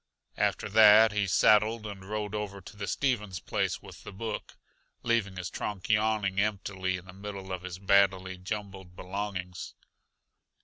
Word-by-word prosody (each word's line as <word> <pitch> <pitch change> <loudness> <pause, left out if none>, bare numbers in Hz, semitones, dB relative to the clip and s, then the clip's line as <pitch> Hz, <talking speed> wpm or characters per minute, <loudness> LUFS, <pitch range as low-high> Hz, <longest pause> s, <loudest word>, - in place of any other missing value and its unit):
After - - 0
that 110 +1 +7
he 105 -1 0
saddled 110 +3 +4
and 100 -2 -7
rode 105 -1 -3
over 105 -2 -4
to 95 - -12
the 100 -1 -5
Stevens 105 -9 -1
place - - -2
with - - -12
the - - -8
book, 105 +2 -6 0.5
leaving 115 -5 0
his 90 -2 -4
trunk 105 -3 -5
yawning 105 -2 +2
emptily 95 -3 -1
in 90 - -12
the 90 - -12
middle 100 -1 -7
of 90 -1 -3
his 90 -1 -6
badly 95 -1 +2
jumbled 95 -2 -6
belongings. 90 -2 -5
100 Hz, 150 wpm, -29 LUFS, 95-105 Hz, 0.5 s, that